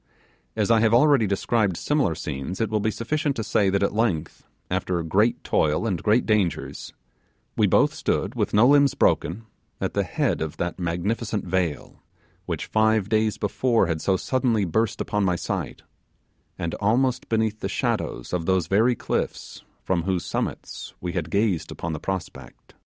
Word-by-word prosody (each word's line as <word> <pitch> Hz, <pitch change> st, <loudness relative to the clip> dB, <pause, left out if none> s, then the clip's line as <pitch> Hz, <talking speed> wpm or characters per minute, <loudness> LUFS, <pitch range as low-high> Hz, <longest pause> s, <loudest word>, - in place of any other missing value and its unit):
As 110 Hz, 0 st, +1 dB
I 115 Hz, -, +5 dB
have 110 Hz, +1 st, +4 dB
already 135 Hz, -3 st, +5 dB
described 100 Hz, -1 st, 0 dB
similar 145 Hz, -, +1 dB
scenes, 75 Hz, +2 st, -5 dB
it 110 Hz, -2 st, -1 dB
will 110 Hz, -, +1 dB
be 110 Hz, -, 0 dB
sufficient 140 Hz, +6 st, -1 dB
to 110 Hz, -, -3 dB
say 105 Hz, -2 st, +2 dB
that 100 Hz, +1 st, +1 dB
at 100 Hz, -, +1 dB
length, 100 Hz, -8 st, -1 dB, 0.2 s
after 85 Hz, -2 st, -1 dB
great 105 Hz, +8 st, +1 dB
toil 75 Hz, +7 st, +1 dB
and 95 Hz, -7 st, -1 dB
great 110 Hz, +3 st, +2 dB
dangers, 105 Hz, -6 st, -1 dB, 0.6 s
we -, -, +3 dB
both -, -, +3 dB
stood -, -, -1 dB
with -, -, -1 dB
no 110 Hz, +4 st, +5 dB
limbs 140 Hz, -1 st, +5 dB
broken 110 Hz, -, +1 dB, 0.3 s
at -, -, -2 dB
the -, -, +1 dB
head -, -, -1 dB
of 80 Hz, -1 st, -4 dB
that 90 Hz, +1 st, -3 dB
magnificent 100 Hz, +5 st, -2 dB
vale 90 Hz, -4 st, -2 dB, 0.5 s
which -, -, -3 dB
five 110 Hz, -2 st, +2 dB
days 110 Hz, -1 st, +1 dB
before 115 Hz, +1 st, +1 dB
had 80 Hz, -2 st, -2 dB
so 95 Hz, -1 st, +2 dB
suddenly 120 Hz, -3 st, +1 dB
burst 105 Hz, +4 st, 0 dB
upon 105 Hz, -1 st, -1 dB
my 90 Hz, -2 st, +2 dB
sight, -, -, -4 dB, 0.7 s
and 85 Hz, 0 st, -3 dB
almost 125 Hz, +5 st, +1 dB
beneath 110 Hz, -1 st, 0 dB
the -, -, -3 dB
shadow -, -, -2 dB
of 85 Hz, -2 st, -2 dB
those 95 Hz, -3 st, +2 dB
very 115 Hz, +5 st, +3 dB
cliffs -, -, -4 dB, 0.2 s
from 90 Hz, -2 st, 0 dB
whose 90 Hz, 0 st, -1 dB
summits -, -, -4 dB
we 90 Hz, -, -4 dB
had 85 Hz, -3 st, -3 dB
gazed 95 Hz, -4 st, 0 dB
upon 85 Hz, -1 st, -5 dB
the 75 Hz, -, -4 dB
prospect. 95 Hz, +1 st, -6 dB
CHAPT -, -, -34 dB
105 Hz, 170 wpm, -24 LUFS, 90-115 Hz, 0.7 s, I